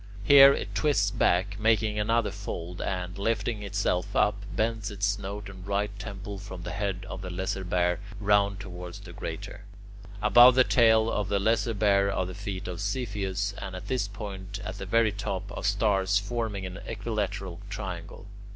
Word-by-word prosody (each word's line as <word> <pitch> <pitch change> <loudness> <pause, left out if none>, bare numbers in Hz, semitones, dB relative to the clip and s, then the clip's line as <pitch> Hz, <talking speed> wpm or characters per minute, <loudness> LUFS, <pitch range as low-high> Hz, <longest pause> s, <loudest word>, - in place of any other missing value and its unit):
Here 140 +3 +9
it - - -3
twists 150 -2 +2
back, 100 +3 +1
making 110 -1 +2
another 115 +1 +1
fold, 90 -3 -6
and, 90 -2 -3
lifting 115 +1 -1
itself 100 -1 -1
up, 100 -1 +2
bends 110 +2 -1
its 100 -1 -2
snout 100 0 -3
and 95 -1 -10
right 100 +1 0
temple 100 -1 -6
from 95 -2 -8
the 90 - -5
head 95 -1 -3
of 95 - -6
the 95 - -6
Lesser 95 +1 -3
Bear 90 -1 +1 0.2
round 100 -1 +2
towards 90 -2 -8
the - - -11
Greater. - - -6 0.6
Above 125 +1 +7
the 130 - +7
tail 110 -3 +4
of 105 -2 -1
the 100 - +1
Lesser 115 +2 +1
Bear 100 -1 +3
are 95 - -1
the 90 - -6
feet 100 0 -5
of 90 +1 -5
Cepheus, 100 -3 -2
and 95 -1 -6
at 90 - -8
this 130 -6 0
point, 100 -1 -7
at 95 +2 -6
the 95 - -6
very 115 +1 +3
top, 100 -2 -4
are - - -6
stars 100 -1 +2
forming 105 -2 -2
an 95 +1 -6
equilateral 100 -4 -3
triangle. - - -6
100 Hz, 175 wpm, -28 LUFS, 95-105 Hz, 0.6 s, Here